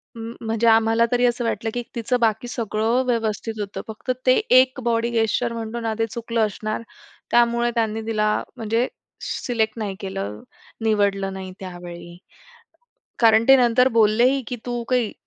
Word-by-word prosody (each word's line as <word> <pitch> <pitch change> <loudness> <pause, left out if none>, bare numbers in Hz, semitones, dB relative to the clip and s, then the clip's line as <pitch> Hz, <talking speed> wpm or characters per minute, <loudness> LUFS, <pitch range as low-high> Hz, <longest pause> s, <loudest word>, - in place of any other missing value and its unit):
म 230 0 -7
म्हणजे 225 +1 +1
आम्हाला 225 +1 +4
तरी 245 0 +3
असं 240 0 +1
वाटलं 225 0 -1
की 245 - -2
तिचं 240 +2 0
बाकी 220 +1 +1
सगळं 225 +2 0
व्यवस्थित 225 -2 -1
होतं. 205 -1 -4
फक्त 220 +4 -4 0.2
ते 255 - +7 0.3
एक 260 +1 +2
बॉडी 235 0 +1
गेस्चर 230 +1 0
म्हणतो 230 0 -5
ना, 225 -1 -2
ते 225 - +2
चुकलं 230 -1 -1
असणार, 215 +2 -4 0.5
त्यामुळे 240 0 +3
त्यांनी 225 -1 0
तिला 215 -1 +1
म्हणजे 230 +2 0 0.4
सिलेक्ट 225 -2 -2
नाही 205 -3 -3
केलं, 105 - -5 0.4
निवडलं 200 -3 +1
नाही 190 -1 -7
त्यावेळी. 175 -1 -9 1.0
कारण 225 -1 +5
ते 270 - +9
नंतर 250 +1 +4
बोललेही, 235 +5 +4
की 245 - -4
"तू 240 -1 -2
काही 245 -4 +1
225 Hz, 155 wpm, -22 LUFS, 215-240 Hz, 1.0 s, ते